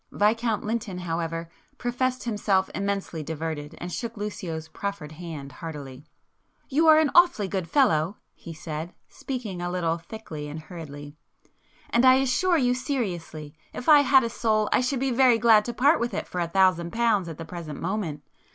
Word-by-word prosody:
Viscount 220 +1 +1
Lynton, 215 -4 -3
however, 165 -1 -3 0.3
professed 255 +1 -1
himself 205 -4 0
immensely 200 -4 -2
diverted, 155 0 -5
and 175 +1 -6
shook 230 -1 -5
Lucio's 175 -6 -5
proffered 200 -3 -5
hand 155 -4 -8
heartily. 140 -2 -8 0.6
"You 310 +4 +3
are 310 -1 +8
an 310 -2 +3
awfully 345 - +5
good 190 -3 -3
fellow!" 200 - +2 0.2
he 170 - -10
said, 160 +1 -6
speaking 225 -9 -5
a 175 - -2
little 170 -2 -1
thickly 165 -5 -8
and 150 +2 -6
hurriedly—"And 155 - -7
I 255 0 +8
assure 270 +7 +2
you 250 -4 +2
seriously 180 - -4 0.2
if - - -7
I 300 -2 +9
had 270 -2 +5
a 230 - -1
soul 215 -2 +1
I - - +4
should 255 +1 -1
be 270 0 0
very 250 -1 +5
glad 220 -2 +5
to 240 - -2
part 285 +7 +4
with 240 +1 -2
it - - -3
for 180 - -3
a 170 - 0
thousand 175 -1 +2
pounds 225 -6 +2
at 160 - -7
the 165 - -7
present 160 -3 -7
moment. 170 -6 -3
195 Hz, 170 wpm, -26 LUFS, 165-240 Hz, 0.6 s, I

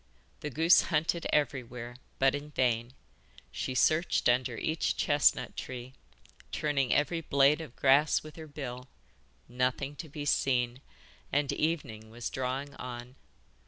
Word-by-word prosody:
The 150 - -4
goose 160 +5 +5
hunted 165 +1 0
everywhere, 125 -4 -1 0.2
but 135 0 +4
in 145 +1 -5
vain. 120 -3 0 0.6
She 130 - -4
searched 155 +6 +3
under 120 -1 +2
each 160 +6 -1
chestnut 145 -1 +2
tree, 125 0 -7 0.6
turning 140 -4 0
every 165 +3 +2
blade 140 +1 +3
of 150 -6 -10
grass 140 +3 +4
with 155 0 -11
her 160 -1 -9
bill 130 -4 -7 0.6
nothing 125 +3 -1
to 160 - -7
be 145 0 -6
seen, 125 -2 +1 0.5
and 145 0 +1
evening 130 -10 -2
was 115 +1 -5
drawing 130 +2 -3
on! 125 0 -7
135 Hz, 130 wpm, -30 LUFS, 125-150 Hz, 0.6 s, goose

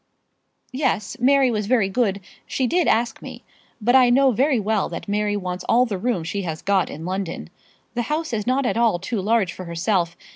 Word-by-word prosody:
"Yes; 260 -5 -1
Mary 265 0 +4
was 210 -2 -2
very 230 -4 +3
good. 200 -1 0 0.3
She 260 - -1
did 345 +7 +1
ask 230 0 +1
me. - - -10 0.4
But 240 +3 +2
I 255 -2 +6
know 265 +2 +4
very 260 +2 +2
well 215 -1 0
that - - -7
Mary 205 0 0
wants 180 -2 -4
all 245 +2 +5
the 205 -6 -4
room 225 -6 -1
she 200 +5 -3
has 165 -3 -5
got 195 -2 +1
in 160 +2 -8
London. 180 - -4 0.4
The 240 - -1
house 310 -2 -2
is 215 -1 -2
not 260 +2 +1
at 240 - 0
all 230 -6 +3
too 195 +4 -3
large 210 -2 +1
for 185 - -8
herself. 170 +1 -1
215 Hz, 205 wpm, -22 LUFS, 190-250 Hz, 0.4 s, I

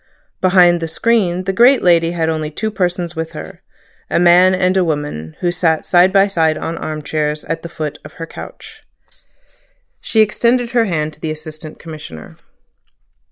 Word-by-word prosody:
Behind 180 -2 +5
the 165 - -3
screen 185 0 0
the 195 +1 -2
great 245 +6 +5
lady 170 -1 +3
had 165 -2 -1
only 155 -1 -2
two 215 +8 -4
persons 180 -3 -2
with 160 0 -5
her: 80 +1 -9 0.5
a - - +1
man 180 +2 +5
and 185 0 +1
a 190 - +3
woman, 145 - -4
who 175 - +1
sat 165 -2 0
side 180 +1 +4
by 195 0 +5
side 165 -5 +1
on 165 - -4
arm 155 -1 -5
chairs 150 0 -2
at 165 +1 -4
the 170 - -8
foot 155 -2 -5
of - - -12
her 165 - -7
couch. - - -11 1.2
She 220 - +2
extended 235 +3 +1
her 235 -2 +2
hand 155 -5 -2
to - - -18
the 160 - -4
Assistant 155 0 -8
Commissioner. 150 - -10
170 Hz, 175 wpm, -17 LUFS, 155-185 Hz, 1.2 s, Behind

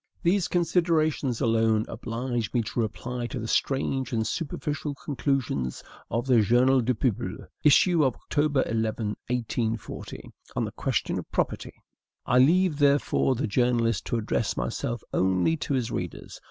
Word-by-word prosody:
These 180 +1 +2
considerations 165 -7 +1
alone 110 -1 +2
oblige 120 -1 -3
me 120 - +3
to 115 - -4
reply 120 +2 -3
to - - -5
the 110 - -4
strange 135 0 0
and 110 -2 0
superficial 150 +1 -3
conclusions 135 - -2 0.3
of 115 +3 -1
the 125 -4 +5
"Journal 125 +5 +4
du 125 +1 0
Peuple" 110 -1 -2 0.2
(issue 160 +3 +5
of 130 -4 +1 0.2
Oct. - - +1 0.3
11, 115 0 0 0.5
1840), 115 -2 -3 0.2
on - - 0
the - - -5
question - - -1
of - - -10
property. - - -2 0.5
I 125 - +3
leave, 165 +3 +4
therefore, 140 -2 +3
the 125 - -1
journalist 115 -1 +1
to 120 - 0
address 110 0 -1
myself 120 -1 -3
only 95 - +2
to 140 - -2
his 120 -2 -1
readers. 90 -2 -5
125 Hz, 145 wpm, -26 LUFS, 115-145 Hz, 0.5 s, the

